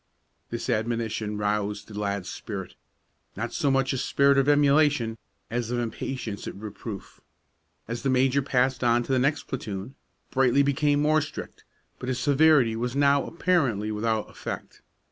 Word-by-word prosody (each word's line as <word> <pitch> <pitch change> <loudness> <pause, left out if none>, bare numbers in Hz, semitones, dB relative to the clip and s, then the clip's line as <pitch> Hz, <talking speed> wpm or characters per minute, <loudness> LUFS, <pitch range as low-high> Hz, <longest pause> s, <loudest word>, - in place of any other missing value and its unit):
This 115 - -4
admonition 110 -2 -1
roused 105 0 -1
the 110 - -12
lad's 100 -2 -2
spirit, 100 -4 -6 0.6
not 120 +2 -3
so 150 -5 +1
much 135 0 +2
a 130 - -1
spirit 140 +2 +3
of 135 +1 +2
emulation 145 -5 +3 0.3
as 120 -1 -2
of 125 - -1
impatience 120 -2 -4
at - - -6
reproof. 105 0 -8 0.7
As 115 +1 -4
the 135 - 0
major 130 +2 +3
passed 130 -1 +1
on 120 0 +3
to 125 - -5
the 130 - +3
next 140 +4 +1
platoon, 105 -2 -5 0.4
Brightly 135 +1 +4
became 145 +1 +2
more 155 +1 +4
strict; 145 - -8 0.3
but 125 - -4
his 130 - -1
severity 145 -5 +4
was 120 +3 -2
now 140 -1 +4
apparently 135 - +1
without 110 0 -1
effect. - - -7
125 Hz, 155 wpm, -26 LUFS, 110-140 Hz, 0.7 s, Brightly